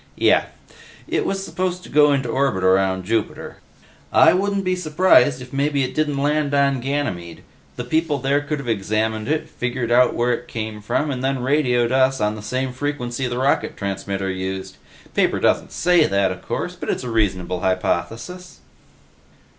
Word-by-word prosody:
"Yeh. - - +4 0.6
It - - -1
was 195 0 -2
supposed 180 +1 -3
to - - -12
go 150 0 +5
into 135 -3 0
orbit 125 -6 0
around 95 0 +2
Jupiter. 110 +1 -2 0.5
I 160 +1 +6
wouldn't 200 +1 0
be 185 0 0
surprised 155 -6 +3
if 125 - -14
maybe 140 0 +1
it 130 - -3
didn't 150 -2 0
land 145 0 +1
on 140 -1 +2
Ganymede; 120 - -3 0.3
the 125 - -4
people 155 +3 0
there 140 +2 +1
could 150 +1 -3
have 140 -3 -7
examined 110 +1 -1
it, 155 +1 -1
figured 120 -1 -3
out 125 +1 +4
where 120 +1 +1
it 120 +1 -5
came 110 -2 -5
from, 145 +8 -1
and 130 -1 -4
then 135 -1 -1
radioed 125 -4 +2
us 130 0 +3
on 105 0 +1
the 105 - -8
same 130 +4 -3
frequency 130 -2 -3
the 120 0 -3
rocket 135 +2 0
transmitter 95 -1 -3
used. 95 0 -5 0.4
Paper - - +2
doesn't - - +1
say 175 -2 +3
that, 100 -1 +1
of 90 - -7
course, - - -4
but - - -6
it's - - -1
a 125 - -4
reasonable 95 -5 0
hypothesis." 115 - -2
130 Hz, 175 wpm, -21 LUFS, 110-145 Hz, 0.6 s, I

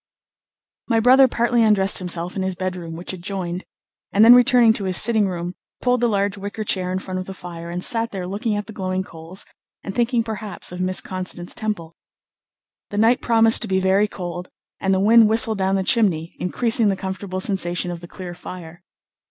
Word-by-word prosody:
My 230 -2 +2
brother 260 +3 +6
partly 240 0 +1
undressed 210 -3 +3
himself 180 -1 -3
in 195 - -2
his 190 -1 -2
bedroom, 180 -3 -5
which 175 +3 -5
adjoined, 180 -1 -5 0.5
and 210 +2 +5
then 235 - +10
returning 245 -2 +6
to 200 - -4
his 185 -1 +2
sitting 220 -2 +3
room, 175 -1 -4 0.3
pulled 250 -1 +1
the 240 - +3
large 200 -2 0
wicker 205 +2 -5
chair 185 -3 -1
in 185 - -1
front 185 -1 -5
of 185 - -6
the 195 - -7
fire, 170 -2 -8
and 175 +1 -3
sat 230 0 0
there 190 -4 -5
looking 205 +4 -2
at 205 0 -3
the 220 - -10
glowing 185 -1 -2
coals, 165 +2 -8 0.4
and 195 - -5
thinking 240 0 +1
perhaps 215 -4 -6
of 180 0 -6
Miss 185 0 0
Constance 185 -1 -4
Temple. 170 -7 -4 0.9
The 205 - -5
night 225 +3 +3
promised 225 -1 +4
to 230 - -1
be 190 -1 +1
very 190 +2 +2
cold, 180 -2 -7 0.3
and 195 - 0
the 190 - +2
wind 220 +2 +6
whistled 220 -1 +1
down 190 0 +1
the 190 - 0
chimney, 180 -7 +1
increasing 225 +3 +1
the 195 - +1
comfortable 190 0 -5
sensation 180 -2 -1
of 175 - -6
the 175 - -11
clear 180 0 -8
fire. 175 -1 -10
195 Hz, 200 wpm, -21 LUFS, 180-220 Hz, 0.9 s, then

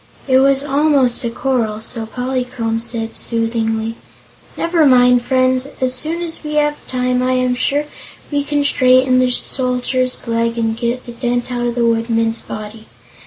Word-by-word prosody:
It 260 -1 +4
was 275 0 +3
almost 280 -4 +2
a 235 - -1
quarrel, 230 -4 -1
so 225 0 -2
Polychrome 245 -2 -3
said 230 -1 -2
soothingly: 225 -1 0 0.6
"Never 335 -1 +1
mind, 250 -3 +5
friends; 255 +1 +1
as 255 -1 +1
soon 320 +6 0
as 330 -1 0
we 300 0 -4
have 295 0 +2
time 250 0 0
I 255 0 +1
am 255 0 +1
sure 285 +4 0 0.5
we 285 -1 0
can 290 0 -1
straighten 255 -2 +3
the 255 0 +2
Soldier's 255 0 -1
leg 230 0 -1
and 225 -1 0
get 235 +2 -3
the 240 - -8
dent 245 +1 -2
out 240 -1 -1
of 240 - -3
the 240 -1 +1
Woodman's 230 0 0
body. 215 +1 -9
250 Hz, 165 wpm, -17 LUFS, 230-260 Hz, 0.6 s, mind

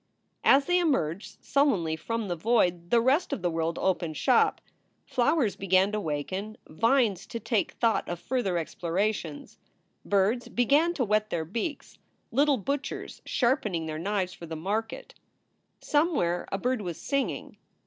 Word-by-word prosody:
As 275 +1 +5
they 360 0 +3
emerged 210 - -1
sullenly 205 - +2
from 230 +6 -3
the 175 - -2
void, 175 -3 +1
the 235 - +5
rest 265 +8 +2
of 185 - -3
the 175 - +1
world 165 0 -1
opened 175 -4 -1
shop. - - +3 0.5
Flowers 250 -3 +1
began 190 +1 +2
to 215 - -1
waken; 185 +7 -4
vines 225 - +1
to 230 - -5
take 225 -3 -1
thought 230 -2 +1
of 175 -1 -4
further 220 -8 -1
explorations; 170 0 -3 0.4
birds 205 +5 +1
began 290 +8 +3
to 255 - 0
whet 215 0 +1
their 160 -2 -2
beaks, 235 - -5 0.3
little 280 +3 +3
butchers 275 +6 -4
sharpening 225 - +1
their 155 -1 -4
knives 190 0 -1
for 170 -3 -10
the 160 - -5
market. 210 +7 -3 0.7
Somewhere 290 - +1
a 195 - 0
bird 250 +3 -1
was 175 -4 -5
singing. 275 -1 -2
210 Hz, 150 wpm, -28 LUFS, 175-255 Hz, 0.7 s, As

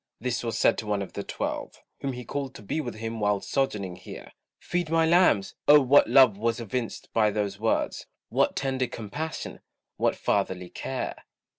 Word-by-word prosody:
this 120 -1 -2
was 115 -2 -2
said - - +3
to 110 - -6
one 105 -1 0
of 95 - -10
the - - -3
twelve, - - -4 0.2
Whom 135 -1 -3
he 125 -1 -7
called 135 +1 -4
to - - -10
be 155 +10 -2
with 120 - -5
him 115 +1 -5
while 105 -1 +2
sojourning 100 -8 -2
here; 90 - -10 0.3
"Feed 175 -2 -2
my 165 0 +3
lambs!" 160 - +4
Oh, 150 0 +9
what 140 +1 +5
love 125 -7 +6
was 115 +2 0
evinced 115 +1 -4
by 110 -2 +4
those 100 -1 -2
words, 110 +1 0 0.2
What - - +2
tender 130 -2 0
compassion, 145 +10 -5 0.4
what - - +2
fatherly 95 -3 -1
care. - - -5
115 Hz, 180 wpm, -27 LUFS, 105-135 Hz, 0.4 s, Oh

